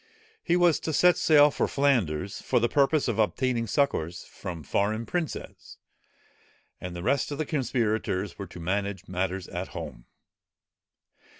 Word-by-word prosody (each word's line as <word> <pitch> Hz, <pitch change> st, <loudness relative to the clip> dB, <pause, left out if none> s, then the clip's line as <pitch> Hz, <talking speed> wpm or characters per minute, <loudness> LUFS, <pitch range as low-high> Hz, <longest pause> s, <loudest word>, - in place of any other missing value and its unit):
He 170 Hz, -, +1 dB
was 175 Hz, -3 st, +4 dB
to 160 Hz, -, -3 dB
set 180 Hz, +3 st, +5 dB
sail 150 Hz, -3 st, +5 dB
for -, -, 0 dB
Flanders, 100 Hz, -, 0 dB
for 125 Hz, -, +1 dB
the 120 Hz, -, +2 dB
purpose 140 Hz, +3 st, +2 dB
of 115 Hz, -2 st, -1 dB
obtaining 115 Hz, +2 st, +1 dB
succours 90 Hz, -, 0 dB
from 85 Hz, -5 st, -8 dB
foreign 110 Hz, +9 st, 0 dB
princes; 170 Hz, +5 st, -5 dB, 1.0 s
and 90 Hz, -1 st, -6 dB
the 85 Hz, -, -6 dB
rest 135 Hz, +5 st, +1 dB
of 145 Hz, -, -3 dB
the 155 Hz, -, -1 dB
conspirators 110 Hz, -, -1 dB
were 100 Hz, -, -5 dB
to 85 Hz, -, -11 dB
manage 100 Hz, +2 st, -2 dB
matters 95 Hz, 0 st, -2 dB
at 90 Hz, +2 st, -4 dB
home. -, -, -7 dB
110 Hz, 145 wpm, -27 LUFS, 95-140 Hz, 1.0 s, set